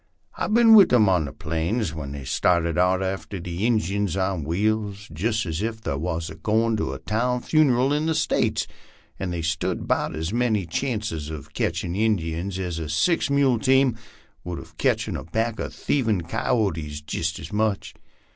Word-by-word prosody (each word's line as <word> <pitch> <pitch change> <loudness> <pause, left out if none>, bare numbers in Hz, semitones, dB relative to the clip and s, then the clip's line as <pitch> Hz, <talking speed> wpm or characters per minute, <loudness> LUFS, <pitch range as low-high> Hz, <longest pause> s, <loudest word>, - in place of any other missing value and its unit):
I've 215 - -1
bin 230 -1 +7
with 205 -3 +8
'em 110 -4 +6
on 90 -5 +3
the 70 - -6
plains 80 - -2
whar 75 -3 -5
they 70 0 -6
started 85 +2 +1
out 90 +2 +2
after 95 +1 -4
the 90 +5 -2
Injuns 100 -4 0
on 95 -4 -1
wheels, 105 +4 -1
jist 110 +7 0
as 80 +1 -3
ef 110 0 -2
they - - -2
war 80 +3 -2 0.2
goin' 110 +1 +2
to - - -2
a - - -5
town 125 +3 -1
funeral 135 -3 +3
in 150 +2 0
the 160 - +1
States, - - +1 0.5
an' 95 - -2
they 85 -2 -3
stood 80 0 -2
'bout - - 0
as 80 +5 -3
many 115 -5 +1
chances 105 - -3
uv 75 -3 -8
catchin' 85 - -2
Injuns 95 -3 0
aza 85 -4 -4
six 160 - +2
mule 140 -4 +3
teamwud 130 -2 +3 0.5
uv 90 -1 -7
catchin' - - +1
a - - -5
pack 110 +7 -2
of - - -3
thievin' 115 -9 0
Ki 85 - -6
o 110 -5 +3
tees, 75 -2 -6
jist 80 +1 -2
as - - -9
much. 105 -1 0
100 Hz, 180 wpm, -24 LUFS, 85-115 Hz, 0.5 s, with